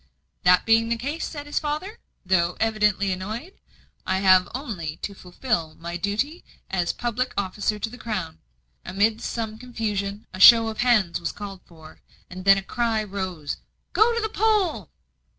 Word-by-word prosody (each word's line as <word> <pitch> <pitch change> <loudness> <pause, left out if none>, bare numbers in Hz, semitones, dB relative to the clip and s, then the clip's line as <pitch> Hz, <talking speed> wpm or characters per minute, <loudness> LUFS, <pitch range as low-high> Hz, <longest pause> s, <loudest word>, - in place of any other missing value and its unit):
"That 180 0 +5
being 225 0 +4
the 235 - +1
case," 285 +7 -4
said 290 -2 -7
his 290 - -1
father, 310 +9 -4 0.3
though 175 -2 +1
evidently 210 -3 +1
annoyed, 215 - -5 0.5
"I - - 0
have 185 -2 +5
only 185 - -5
to 200 - -3
fulfil 180 -3 -3
my 170 +1 -5
duty 215 - -2 0.3
as 180 -2 0
public 245 +1 -3
officer 200 +2 -1
to 210 - -3
the 245 +2 -11
Crown." 210 - -4 0.4
Amidst 215 +4 0
some 220 -2 -4
confusion, 210 -4 -3
a 185 - -7
show 230 +2 +9
of 220 - -7
hands 220 -8 +3
was 170 -2 -3
called 200 -2 -8
for; 160 -2 -16 0.3
and 185 +1 -8
then 195 0 +7
a 195 - -3
cry 230 0 0
rose 185 -7 -4
of - - -27 0.3
"Go 465 +2 +4
to 465 - 0
the 440 - -1
poll!" 390 - +1
210 Hz, 170 wpm, -24 LUFS, 185-240 Hz, 0.5 s, show